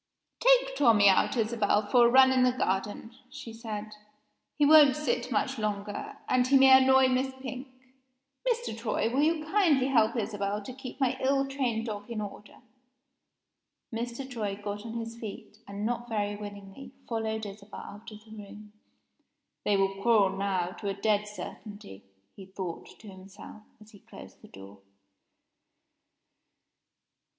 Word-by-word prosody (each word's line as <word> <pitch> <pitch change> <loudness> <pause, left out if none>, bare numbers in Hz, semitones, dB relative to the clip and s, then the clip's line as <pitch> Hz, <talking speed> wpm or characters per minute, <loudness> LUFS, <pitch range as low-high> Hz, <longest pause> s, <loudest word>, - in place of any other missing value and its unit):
"Take - - +4
Tommie 220 - +5
out, 195 +6 +2
Isabel, 215 -2 +1
for 240 +3 +5
a - - +3
run 260 +1 +6
in 260 -1 +2
the 250 0 +4
garden," 205 0 -3
she 230 - -10
said. 215 -2 -7 0.7
"He 295 - +4
won't 295 -3 +7
sit 275 -5 -1
still 250 -3 -1
much - - -4
longer 205 -1 -4
and 255 0 +2
he 275 +1 +5
may 265 0 +8
annoy 265 0 +5
Miss 255 +1 0
Pink. 260 0 -7 0.8
Mr. 475 - -2
Troy, 225 0 -2
will 270 - +2
you 310 0 +1
kindly 315 -8 +2
help 230 -3 +3
Isabel 205 -3 -2
to 255 - -8
keep 260 0 -10
my 260 -1 0
ill 275 +1 +1
trained 250 -5 -2
dog 210 -1 -6
in 230 -2 -4
order?" 205 0 -9 1.3
Mr. 240 +3 -5
Troy 210 -6 -4
got 205 +2 -6
on 225 - -7
his 230 0 -6
feet, 215 -1 -9
and, 200 +1 -5
not 240 +1 -3
very 205 -2 -2
willingly, 205 +4 -10
followed 220 -1 -3
Isabel 205 0 -10
out 205 +3 -11
of 215 0 -13
the 220 - -17
room. 210 0 -12 0.9
"They 205 - +2
will 195 0 -1
quarrel 205 -4 +3
now, 190 -3 -1
to 200 - -3
a 195 - -3
dead 210 +1 0
certainty!" 205 - -10 0.3
he 195 -2 -12
thought 190 -3 -7
to 220 - -14
himself, 195 +2 -12 0.2
as 215 0 -17
he 205 - -16
closed - - -14
the - - -14
door. 100 +1 -13
220 Hz, 160 wpm, -28 LUFS, 205-255 Hz, 1.3 s, may